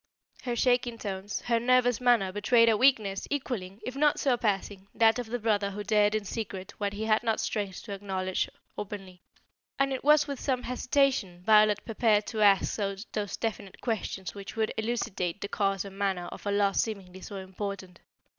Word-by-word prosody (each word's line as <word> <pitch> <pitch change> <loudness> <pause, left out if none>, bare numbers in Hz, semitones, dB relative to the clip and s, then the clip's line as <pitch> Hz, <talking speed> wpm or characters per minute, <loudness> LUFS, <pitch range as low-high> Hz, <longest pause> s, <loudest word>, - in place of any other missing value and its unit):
Her 245 -2 -2
shaking 245 -1 +2
tones, 200 -1 -4
her 235 -1 +1
nervous 245 0 +3
manner 235 -6 +3
betrayed 230 +4 +4
a 225 - +4
weakness 215 -5 +2
equalling, 220 -9 -3
if 255 - -5
not 295 +1 +3
surpassing, 205 -6 0
that 225 +1 +4
of 245 - -4
the 240 +2 -2
brother 210 -3 +1
who 205 +1 -5
dared 210 +1 +3
in 215 -1 -2
secret 195 -3 -5
what 205 -1 -1
he 215 +2 -4
had 215 -1 +3
not 225 -2 0
strength 200 -4 -3
to 210 - -9
acknowledge 190 -2 -2 0.3
openly, 195 -3 -7 0.6
and 275 0 +1
it 260 - -4
was 300 +1 +5
with 280 -2 -4
some 255 -3 -1
hesitation 250 -8 0
Violet 210 0 +5
prepared 220 -2 +2
to 220 -2 -3
ask 200 -2 +4
those 205 0 -3
definite 210 -4 -4
questions 210 -5 -3
which 200 -1 -8
would 220 -1 0
elucidate 210 -6 -2
the 200 - -4
cause 195 -1 0
and 195 0 -10
manner 190 -3 0
of - - -8
a - - +1
loss 200 -1 +2
seemingly 190 -4 -6
so 200 - -8
important. 190 -1 -6
210 Hz, 180 wpm, -29 LUFS, 195-240 Hz, 0.6 s, was